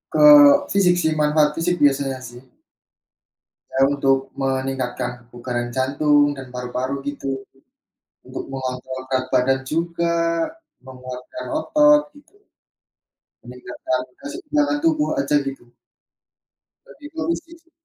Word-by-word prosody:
Ke - - +6 0.5
fisik 185 -3 +4
sih, 160 - +1
manfaat 150 0 +3
fisik 175 +2 0
biasanya 135 -2 +2
sih. 120 0 -13 1.3
Saya 135 - +1
untuk 135 -1 0
meningkatkan 130 -2 -2
kebugaran 120 0 -5
jantung 145 +2 +2
dan 130 -1 -9
paru-paru, 125 +2 -3
gitu. 135 -1 -5 0.8
Untuk - - -6
mengontrol 130 -1 -5
berat 130 -1 0
badan 130 +1 +2
juga, 170 +1 -1 0.7
menguatkan 130 - -9 0.2
otot, 295 -2 +4
gitu. 290 +7 -20 1.1
Meningkatkan 125 +1 -4 0.2
keseimbangan 295 -1 -1
tubuh 310 -2 +2
aja 215 - +1
gitu. 135 -3 -8 1.2
Lebih 295 +1 -12
ke 320 - -7
fisik 335 0 -4
sih. 335 0 -34
135 Hz, 110 wpm, -21 LUFS, 130-180 Hz, 1.3 s, Ke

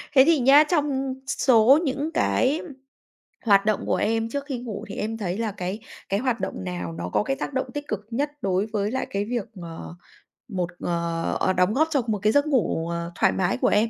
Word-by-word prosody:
Thế 265 - +9
thì 325 -1 +4
nhá, 275 +4 +7
trong 275 -5 0
s - - -1
số 250 +3 +7
những 285 +1 -1
cái 280 +5 +1 0.8
hoạt 200 -2 +5
động 215 -1 +1
của - - +1
em 225 +1 0
trước 280 +3 -4
khi 270 -4 -4
ngủ 230 -5 -6
thì - - -6
em 225 +1 -3
thấy 190 -4 -3
là 225 -1 -1
cái 190 +1 -4 0.3
cái 200 - +1
hoạt 245 -1 0
động 95 - -4
nào 90 -2 -4
nó 85 +2 -5
có - - +2
cái 270 +5 -1
tác 275 - -5
động 260 - -1
tích 290 0 -5
cực 210 0 -4
nhất 285 +5 -1
đối 195 -1 +1
với 210 -1 -2
lại 260 - -2
cái 200 +1 -1
việc, 235 -1 -2 0.2
ờ, 165 0 -8 0.5
một 180 -6 -2
ờ, 170 -1 -2
ờ, 190 - +2
đóng 180 +3 +2
góp 315 +6 +3
cho 285 -4 +2
một 215 -2 0
cái 210 +1 +3
giấc 285 +1 +3
ngủ, 220 - 0
ờ, 170 0 -4
thoải - - +3
mái 185 0 0
của - - +1
em? 215 +2 +3
220 Hz, 230 wpm, -24 LUFS, 185-265 Hz, 0.8 s, Thế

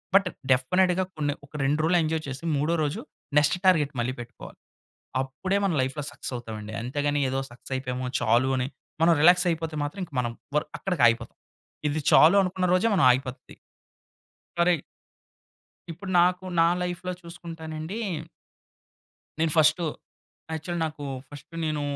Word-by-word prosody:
But 195 -1 +6 0.2
డెఫినిట్‌గా 180 +8 +3
కొన్ని 145 -2 -1
ఒక - - -25
రెండు 145 +3 +1
రోజులు 170 +3 +3
ఎంజాయ్ 155 0 -1
చేసి 135 +3 -6
మూడో 150 +4 +1
రోజు 145 -1 -2 0.4
నెక్స్ట్ 150 +4 +2
టార్గెట్ 155 -6 +4
మళ్ళీ 130 +2 -1
పెట్టుకోవాలి. 120 0 -10 0.6
అప్పుడే 135 +9 -2
మన 190 - +1
లైఫ్‌లో 135 +3 -2
సక్సెస్ 140 - -7
అవుతామండి. 110 -3 -7
అంతేగాని 145 +4 -1
ఏదో 135 +1 -1
సక్సెస్ 125 +2 -9
అయిపోయాము. 125 -1 -3
చాలు 120 +3 +3
అని 125 0 0 0.4
మనం 170 0 +6
రిలాక్స్ 180 +3 +6
అయిపోతే 160 -1 -3
మాత్రం 180 +7 -4 0.2
మనం 120 -1 -2 0.2
వర్ 150 - +2
అక్కడికి 180 -10 0
ఆగిపోతాం. 115 0 -1 0.5
ఇది 150 +2 -1
చాలు 160 +5 +7
అనుకున్న 185 -1 -1
రోజే 185 +5 +3
మనం 175 - +3
ఆగిపోద్ది. 130 0 -4 1.0
కరి 170 -3 +3 1.1
ఇప్పుడు 185 +4 -7
నాకు 180 +1 +2 0.2
నా 165 - +6 0.2
లైఫ్‌లో 180 +1 -3
చూసుకుంటానండి 165 +1 -7 1.4
నేను 160 -1 +2
ఫస్టూ, 155 +2 +4 0.7
యాక్చువల్లీ 165 +2 -3
నాకు 150 -2 -7 0.2
ఫస్ట్ 145 +3 -12
నేను 155 -1 -1
155 Hz, 140 wpm, -26 LUFS, 135-175 Hz, 1.4 s, చాలు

